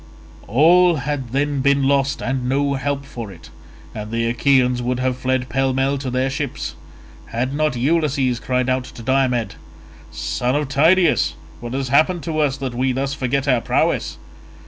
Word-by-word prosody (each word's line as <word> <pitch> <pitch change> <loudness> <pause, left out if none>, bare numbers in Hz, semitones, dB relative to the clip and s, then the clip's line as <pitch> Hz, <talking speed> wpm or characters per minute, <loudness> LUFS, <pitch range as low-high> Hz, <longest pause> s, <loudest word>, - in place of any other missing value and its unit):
All 170 - +5
had 140 -2 -3
then 140 +2 0
been 140 0 +3
lost 135 0 +1
and 130 -1 -2
no 140 +1 +1
help 140 0 -2
for 115 -6 -7
it, - - -14 0.4
and 105 -1 -6
the 115 +1 -1
Achaeans 125 0 +2
would 125 +1 -1
have 130 0 0
fled 130 0 -1
pell 135 0 0
mell 135 +1 0
to 135 -1 -4
their 130 +2 0
ships, 140 -2 -4 0.5
had 125 +4 -2
not 150 -2 0
Ulysses 135 -2 +1
cried 125 +1 -1
out 130 0 0
to 115 - -11
Diomed, 130 -2 +1 0.6
"Son 65 - -2
of 145 -2 -1
Tydeus, 165 +6 +3 0.2
what 120 0 -7
has 135 -1 -2
happened 160 +5 +3
to 160 -2 -2
us 145 -2 +1
that 135 -2 -4
we 130 +2 0
thus 135 +2 -2
forget 135 +1 -1
our 125 -3 +3
prowess? - - 0
135 Hz, 170 wpm, -20 LUFS, 125-140 Hz, 0.6 s, All